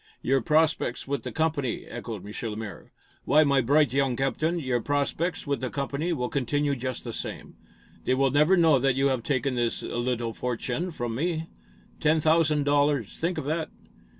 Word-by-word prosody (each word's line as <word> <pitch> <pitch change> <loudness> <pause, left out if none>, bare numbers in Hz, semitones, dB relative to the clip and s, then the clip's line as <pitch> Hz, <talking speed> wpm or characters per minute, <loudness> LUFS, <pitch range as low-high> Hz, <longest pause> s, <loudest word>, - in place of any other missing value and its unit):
"Your 135 +1 +2
prospects 155 -3 +1
with 140 -2 -1
the - - -6
company?" 155 -6 -1
echoed 115 -5 -7
M. 105 +2 -5
Lemaire. 105 -1 -7 0.3
"Why, 150 +3 +5
my 140 -2 +3
bright 145 +3 +3
young 135 -2 +2
captain, 135 +6 0
your 130 -6 -1
prospects 145 +6 -1
with 140 -4 -1
the 130 - -2
company 140 +5 -2
will 125 -7 -1
continue 140 +2 0
just 130 -1 -4
the 115 - -6
same. - - -6 0.5
They 130 - +2
will 135 0 +2
never 150 +7 +4
know 160 -5 +5
that 135 0 +2
you 135 +1 +2
have 130 -3 0
taken 135 +1 0
this 120 -2 -1
little 120 -1 -2
fortune 125 +8 -2
from 120 -8 -4
me. 160 +5 -2 0.5
Ten 155 +1 +3
thousand 155 -1 +3
dollars! 145 -5 +1
Think 170 +2 -1
of - - -3
that!" 160 +2 -1
140 Hz, 180 wpm, -27 LUFS, 125-155 Hz, 0.5 s, Why